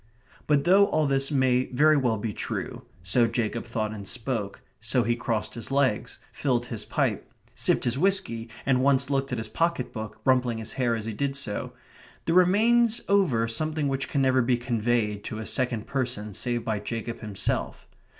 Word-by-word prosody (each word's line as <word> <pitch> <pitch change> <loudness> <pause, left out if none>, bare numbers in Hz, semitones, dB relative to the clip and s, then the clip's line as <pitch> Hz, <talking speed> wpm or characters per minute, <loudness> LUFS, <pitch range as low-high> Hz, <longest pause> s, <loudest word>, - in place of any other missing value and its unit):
But 145 -2 +3
though 195 +4 +5
all 155 -1 +1
this 135 -1 +1
may 130 -2 +2
very 155 +5 +4
well 125 -6 +1
be 105 +1 -3
true - - -4 0.2
so 115 +7 +3
Jacob 115 0 -2
thought 110 -2 -2
and 100 -2 -7
spoke 110 -4 -2 0.2
so 120 +2 +1
he 120 +2 +1
crossed 115 -2 -2
his 115 -3 -6
legs 135 -5 0 0.2
filled - - 0
his - - -5
pipe - - -1 0.2
sipped - - +1
his 120 +2 0
whisky, 170 -12 0 0.2
and 130 -2 +3
once 140 +1 +3
looked 135 0 0
at 125 - -1
his 110 0 -2
pocket 170 +7 -1
book, 110 -1 -7
rumpling 125 -3 +2
his 110 -1 -4
hair 125 -3 +1
as 110 -1 -4
he 110 - -3
did 140 +5 -2
so, 140 -7 -3 0.5
there 165 - +1
remains 225 +6 +4
over 160 - +3
something 155 +5 -1
which 135 0 -2
can 140 -2 +1
never 130 -1 +3
be 120 0 +2
conveyed 115 -3 0
to 110 - -5
a 110 - -5
second 120 -4 -1
person 120 -6 -3
save 120 +2 -1
by 110 -2 -1
Jacob 115 +2 -5
himself. 105 -4 -3
125 Hz, 185 wpm, -26 LUFS, 115-140 Hz, 0.5 s, though